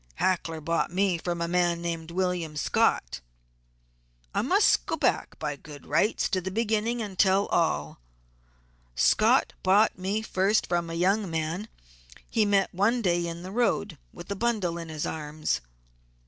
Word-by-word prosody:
Hackler 165 - 0
bought 165 +3 0
me 185 -1 +1
from 170 0 -3
a 170 - 0
man 175 -1 +1
named 170 -1 -4
William 175 -3 -2
Scott. - - +1 1.1
I - - +1
must - - +3
go - - 0
back - - 0
by 150 -2 -3
good 145 0 -12
rights 215 - +1
to 185 -3 0
the 185 - -4
beginning 225 +3 0
and 195 -3 -8
tell 195 +1 +4
all: 75 - 0 1.0
Scott - - +3
bought 195 +2 +3
me 200 +4 -1
first 205 +2 +1
from 175 -1 -1
a 165 - -4
young 195 +3 +1
man 165 +5 -3 0.6
he 220 -2 +1
met 200 -1 +2
one 225 +6 +1
day 175 -2 +1
in 170 +1 -6
the 185 - -7
road, 205 - 0
with 175 +3 -10
a - - -1
bundle 200 -6 -1
in 165 -1 -7
his 155 -2 -3
arms. 150 - -3
180 Hz, 160 wpm, -27 LUFS, 165-200 Hz, 1.1 s, tell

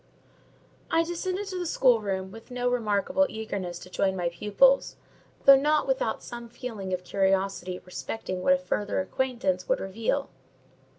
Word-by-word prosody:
I 330 - +3
descended 365 +4 -3
to 370 -2 -4
the 355 - -2
schoolroom 205 -10 +2
with 225 +4 -12
no 245 0 -2
remarkable 245 +4 +1
eagerness 200 -5 -4
to 180 - -11
join 190 0 +1
my 175 -2 0
pupils, 210 +10 +3 0.5
though 275 - +10
not 300 +3 +2
without - - 0
some 235 -1 -8
feeling 230 -5 -6
of 180 0 -2
curiosity 190 -1 0
respecting 185 0 -5
what 275 - +5
a - - +4
further 210 -6 -2
acquaintance 190 -3 -1
would - - +2
reveal. 225 +8 -2
220 Hz, 150 wpm, -27 LUFS, 190-275 Hz, 0.5 s, though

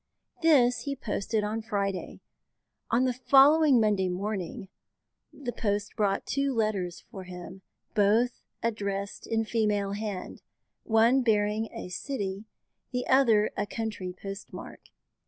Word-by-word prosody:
This 265 -7 +5
he 280 -1 -2
posted 215 -3 -2
on 215 +2 -2
Friday. 200 -3 -3 0.7
On 240 +2 +3
the 255 - +1
following 275 +2 +6
Monday 205 -4 +2
morning, 190 0 -4 0.6
the 260 -4 -5
post 205 -3 -2
brought 200 -3 0
two 275 -1 0
letters 200 -6 -1
for 190 -2 -8
him, 180 +1 -9 0.3
both 220 +4 +2 0.2
addressed 200 -3 -3
in 225 0 0
female 210 -3 0
hand, 205 -2 -5 0.4
one 230 +4 +4
bearing 215 -1 +1
a - - -7
city, 200 0 -4 0.5
the 250 -1 -2
other 230 -6 +4
a - - -2
country, 210 -5 -4
post 195 0 -7
mark. - - -9
215 Hz, 125 wpm, -28 LUFS, 200-240 Hz, 0.7 s, following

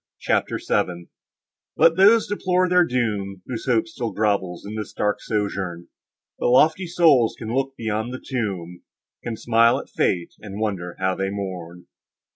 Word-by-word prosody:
CHAPTER - - 0
VII 85 -1 -1 0.7
Let 165 0 +5
those 210 +5 +5
deplore 185 -3 +1
their 180 0 +5
doom, 105 -6 -2
Whose 120 0 -6
hope 125 +4 +2
still 125 -9 -4
grovels 100 -5 -1
in 105 - -6
this 110 -2 -6
dark 105 0 -1
sojourn. 100 -5 -3 0.5
But - - +1
lofty 160 +8 +4
souls 155 -9 +4
can 110 0 -5
look 135 +1 -1
beyond 110 +1 -2
the 130 - -6
tomb, 95 -9 -4 0.4
Can 115 -2 -4
smile 115 +1 +3
at - - -8
fate, 85 -2 0
and 100 -1 -8
wonder 95 -5 -3
how 95 0 0
they 95 +1 -2
mourn. 90 -3 -6
110 Hz, 155 wpm, -23 LUFS, 95-130 Hz, 0.7 s, Let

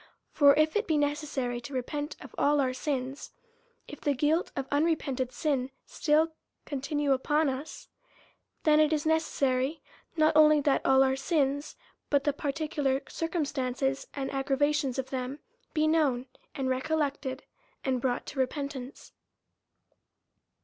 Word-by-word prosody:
For 285 -2 +6
if 310 +3 +2
it 425 +2 +1
be 315 - +2
necessary 290 -4 -1
to 260 +3 -8
repent 290 +4 -3
of - - -11
all 290 +1 +3
our 260 -2 +1
sins; 265 0 -4 0.5
if 295 - -10
the 290 -1 +1
guilt 305 +6 +1
of 275 -1 -3
unrepented 285 -4 0
sins 275 -5 -1 0.2
still 315 +1 +1 0.3
continue 285 +1 -1
upon 295 +3 +1
us, 270 +4 -6 0.8
then 305 -1 +5
it 305 0 +4
is 305 -1 0
ne 320 0 +4
cessary 275 -1 -1 0.4
not 310 0 +4
only 305 -1 +7
that 280 -1 +2
our 265 0 +4
sins, 285 0 0 0.3
but 285 -1 +3
the 290 - +1
particular 285 -1 -1
cir 330 - -3
cumstances 270 -4 -1
and 270 -1 -3
aggravations 275 0 0
of 265 -1 -3
them, 260 +1 -3 0.4
be 310 0 +3
known, 295 -6 +2 0.3
and 265 -1 -2
recollected, 275 0 -1 0.4
and 260 -2 0
brought 245 -1 -1
to 280 - -7
repentance. 270 -1 -4
285 Hz, 140 wpm, -29 LUFS, 265-305 Hz, 0.8 s, only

